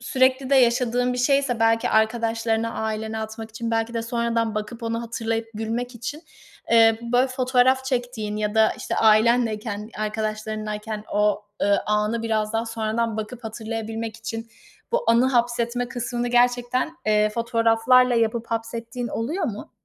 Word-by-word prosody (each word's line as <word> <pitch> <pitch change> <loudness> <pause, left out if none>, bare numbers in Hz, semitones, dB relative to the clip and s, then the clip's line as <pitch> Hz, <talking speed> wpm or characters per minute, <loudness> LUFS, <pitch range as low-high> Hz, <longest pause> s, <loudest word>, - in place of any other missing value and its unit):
sürekli 260 +1 +1
de 275 - +5
yaşadığın 245 0 +3
bir 250 - -3
şeyse, 275 -2 +2
belki 225 0 +3
arkadaşlarına, 225 0 +1
ailene 220 0 -3
atmak 220 0 -6
için, 230 +1 -4
belki 225 +1 -1
de 230 - -1
sonradan 230 -1 -1
bakıp 215 +2 -5
onu 230 0 -2
hatırlayıp 225 -1 -3
gülmek 235 +3 -3
için, 265 +8 -6 0.5
eee, 225 -1 +6
böyle, 250 +2 +4
fotoğraf 255 0 +2
çektiğin 245 -5 -2
ya 210 0 -2
da 220 0 +4
işte - - -3
ailenleyken, 220 -1 +2
arkadaşlarınlayken 215 0 -3
o, 210 0 +2 0.2
ııı, 200 0 +3
anı 210 +2 0
biraz 215 -1 -1
daha 225 +1 -1
sonradan 225 0 -2
bakıp 225 +2 -6
hatırlayabilmek 225 0 -5
için 225 0 -6 0.4
bu - - +1
anı 235 +2 +4
hapsetme 240 -1 0
kısmını 245 -1 -3
gerçekten, 245 +5 +1
eee, 210 0 +3
fotoğraflarla 230 +2 +3
yapıp 230 0 0
hapsettiğin 230 +1 -4
oluyor 315 +11 -2
mu? 210 -5 -5
230 Hz, 140 wpm, -23 LUFS, 220-245 Hz, 0.5 s, eee